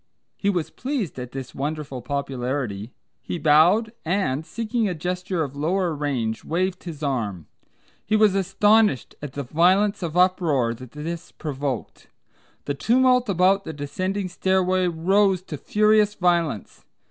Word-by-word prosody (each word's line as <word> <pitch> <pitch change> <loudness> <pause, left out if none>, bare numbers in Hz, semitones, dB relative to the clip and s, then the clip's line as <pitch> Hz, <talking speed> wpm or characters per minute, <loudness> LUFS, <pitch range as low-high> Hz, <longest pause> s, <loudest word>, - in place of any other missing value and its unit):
He 200 - -1
was 175 -5 -1
pleased 250 - -3
at 125 +1 -8
his 130 -2 -6
wonderful 145 -2 -4
popularity, 125 -4 -3 0.3
he - - -4
bowed, 165 +9 +4
and, 165 -5 0
seeking 225 +3 -2
a 180 - -3
gesture 180 +1 -2
of 140 -2 -6
longer 170 +3 0
range, 125 -7 -2
waved 185 +3 -2
his 155 -3 -7
arm. 105 - -2 0.6
He 215 - 0
was 215 -2 +5
astonished 195 - +3
at 145 -2 -6
the 140 - -4
violence 185 - +2
of 170 -1 -3
uproar 165 -10 +2
that 125 +1 -12
this 165 +3 -6
provoked. 140 -5 -5 0.6
The 145 - -1
tumult 250 - +3
about 195 +1 +3
the 160 - -6
descending 185 +7 -3
stairway 185 0 +1
rose 185 +3 +2
to 165 - -6
furious 210 +2 +3
violence. 170 - 0
170 Hz, 140 wpm, -24 LUFS, 140-195 Hz, 0.6 s, was